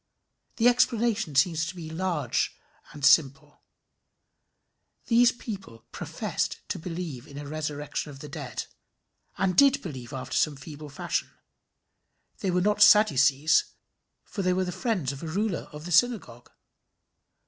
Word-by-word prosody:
The 235 0 +3
explanation 230 - +2
seems 160 +3 +3
to 170 - -6
me 165 -2 -7
large 160 -6 -1 0.3
and 145 -2 -4
simple. 145 0 +3 1.4
These 240 +1 +5
people 195 - -9
professed - - -4
to - - -3
believe 160 -6 -6
in 140 - -11
the 145 - -6
resurrection 150 0 -4
of 140 - -10
the 150 - -9
dead, 145 -5 -6 0.7
and 185 -1 +1
did 275 +6 +6
believe 130 -7 -7
after 130 -2 -5
some 150 -2 +2
feeble 150 +2 -10
fashion. 140 - -3 1.1
They 195 - -1
were 180 0 +1
not 210 +2 +1
Sadducees, 155 - +5 0.5
for 200 - -5
they 185 -1 +2
were 185 +1 0
the 180 - -3
friends 185 - -1
of 140 - -9
a 165 - -5
ruler 195 +3 -2
of 150 0 -9
the 175 - -6
synagogue. 170 - +1
160 Hz, 140 wpm, -27 LUFS, 145-195 Hz, 1.4 s, did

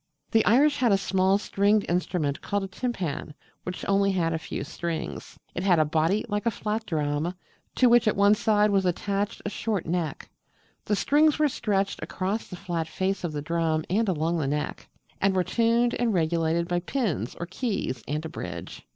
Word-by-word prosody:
The 225 -1 +4
Irish 285 +6 +4
had 245 -5 +3
a 195 - +5
small 190 0 +2
stringed 205 +1 +2
instrument 170 -4 -1
called 200 -1 -1
a - - -3
Timpan, 185 - -4 0.3
which 180 0 -6
had - - -6
only 195 -1 +2
a 165 -1 +1
few 155 - -5
strings. 170 +3 -5 0.2
It - - -3
had 185 -2 +4
a 155 - +4
body 165 +8 +1
like 205 +1 -2
a - - +6
flat 215 0 -3
drum, 155 +2 -1 0.4
to 255 - +5
which 240 -1 +5
at 215 - +3
one 200 +1 +5
side 210 -1 +3
was 195 -1 +3
attached 200 +4 -2
a - - 0
short 210 -3 -2
neck: 165 -3 -3 0.5
the 210 - +1
strings 300 +7 +3
were 305 0 +4
stretched 200 -7 -1
across 195 +4 -3
the 180 - -8
flat 170 -2 -3
face 190 +3 -2
of 175 - -2
the 145 -1 -4
drum 160 -1 0
and 215 +2 +2
along 165 0 0
the 145 - -1
neck: 150 +1 -3 0.3
and 195 0 +3
were 185 - +3
tuned 235 +3 +2
and 235 -4 0
regulated 165 0 +1
by 175 -1 0
pins 180 - -2
or 170 - -3
keys 185 - -3
and 150 +3 -2
a - - -4
bridge. - - -7
190 Hz, 195 wpm, -26 LUFS, 165-210 Hz, 0.5 s, a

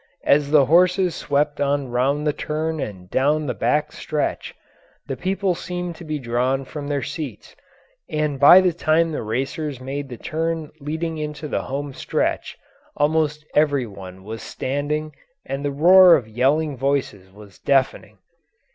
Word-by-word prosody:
As 145 0 +3
the 145 -2 +5
horses 180 +4 +3
swept 145 0 -1
on 140 -1 0
round 135 +5 0
the 150 - +1
turn 155 +1 -3
and 95 -8 -6
down 150 +3 +1
the 130 - -2
back 150 +6 0
stretch 155 -2 -3 0.5
the 135 - -4
people 190 +5 -1
seemed 175 0 -5
to - - -10
be 155 -2 -3
drawn 130 +1 -1
from 145 +1 -7
their 145 -2 -1
seats, 140 -6 -7 0.5
and 150 -3 -1
by 175 +6 +9
the 180 -2 +2
time 165 0 +1
the 150 - -3
racers 135 +5 -3
made 135 +2 -5
the 120 - -7
turn 160 +2 -3
leading 160 +2 -4
into 150 0 -5
the - - -2
home 140 +1 -5
stretch - - -2 0.4
almost 150 0 +1
every 145 -4 +2
one 95 -3 -11
was 110 +2 -7
standing 150 +3 -3 0.3
and 135 +1 -4
the 145 - 0
roar 175 +5 +7
of 120 - -2
yelling 140 +6 +1
voices 130 -8 -2
was 100 -1 -15
deafening. 135 -2 0
145 Hz, 155 wpm, -22 LUFS, 135-155 Hz, 0.5 s, by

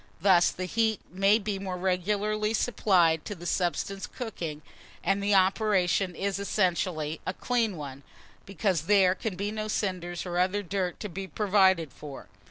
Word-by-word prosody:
Thus 180 -1 +5
the 185 - -5
heat 220 +2 +1
may 195 +3 +4
be 205 -2 -3
more 190 -2 -4
regularly 210 +4 0
supplied 175 -9 +2
to 205 - -5
the 175 -1 -11
substance 190 +2 -1
cooking, 165 - -6 0.4
and 195 +1 +1
the 200 0 +2
operation 190 -2 +2
is 195 +1 -2
essentially 170 -6 -1
a 185 - -2
clean 230 -6 0
one, 140 -2 -7 0.5
because 190 -3 -1
there 195 -3 +5
can 205 0 -4
be 200 +3 -3
no 215 0 -4
cinders 180 -5 -3
or 175 -1 -2
other 190 +3 +1
dirt 185 -1 -2
to 210 - -3
be 190 +1 -6
provided 190 -6 +2
for. 140 -8 -10
190 Hz, 160 wpm, -28 LUFS, 175-205 Hz, 0.5 s, Thus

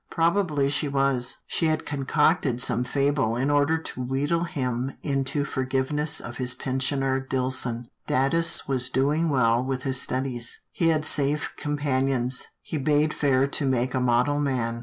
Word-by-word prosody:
Probably 165 -4 +1
she 145 +1 +2
was, 135 -3 +1
she 165 - 0
had 155 0 -1
concocted 145 -1 +1
some 125 0 +1
fable 135 -2 0
in 135 +4 0
order 145 +2 +3
to 160 -5 -7
wheedle 145 +7 -1
him 130 -4 -3
into 140 0 -1
forgiveness 135 +3 0
of 120 - -8
his 125 -1 +1
pensioner 135 +1 -1
Dillson. 130 -2 -1 0.2
Datus 165 +6 +3
was 130 -2 0
doing 145 +6 +1
well 120 -3 +2
with 130 0 -3
his 130 -2 +2
studies. 125 -2 -2
He 165 - 0
had 155 -2 +2
safe 145 0 0
companions, 135 -3 -1 0.2
he 155 - -4
bade 150 +2 +2
fair 135 -2 +2
to 145 - -2
make 130 -1 0
a 130 - 0
model 125 +4 +2
man. 120 -5 -1
135 Hz, 155 wpm, -25 LUFS, 130-145 Hz, 0.2 s, order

